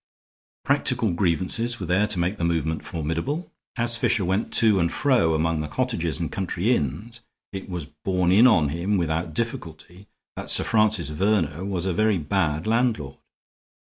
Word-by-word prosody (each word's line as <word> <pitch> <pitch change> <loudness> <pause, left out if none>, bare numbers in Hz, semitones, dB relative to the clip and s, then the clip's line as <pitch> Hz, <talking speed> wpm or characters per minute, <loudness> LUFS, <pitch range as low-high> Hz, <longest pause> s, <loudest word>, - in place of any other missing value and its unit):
Practical 125 -6 +1
grievances 95 +7 0
were 95 - -4
there 95 +5 +2
to 105 -2 0
make 90 +4 -1
the - - -2
movement 80 -2 -1
formidable. 85 - -4 0.2
As 120 -1 +2
Fisher 105 -4 +1
went 95 +4 -1
to 110 -4 +5
and 85 -1 +1
fro 120 - +2
among 80 0 0
the 75 - -4
cottages 110 -8 -2
and 85 -3 -3
country 95 +5 0
inns, 105 - -4 0.3
it 95 0 -7
was 90 -4 -4
borne 90 +4 -1
in 110 +7 +7
on 80 - +3
him 90 +7 -1
without 80 -1 -2
difficulty 90 -3 -6 0.3
that - - -7
Sir - - +4
Francis 110 -8 +1
Verner 85 -1 0
was 95 -3 -3
a 95 - 0
very 110 +1 +2
bad 80 -1 -1
landlord. 110 - 0
95 Hz, 165 wpm, -24 LUFS, 80-110 Hz, 0.3 s, in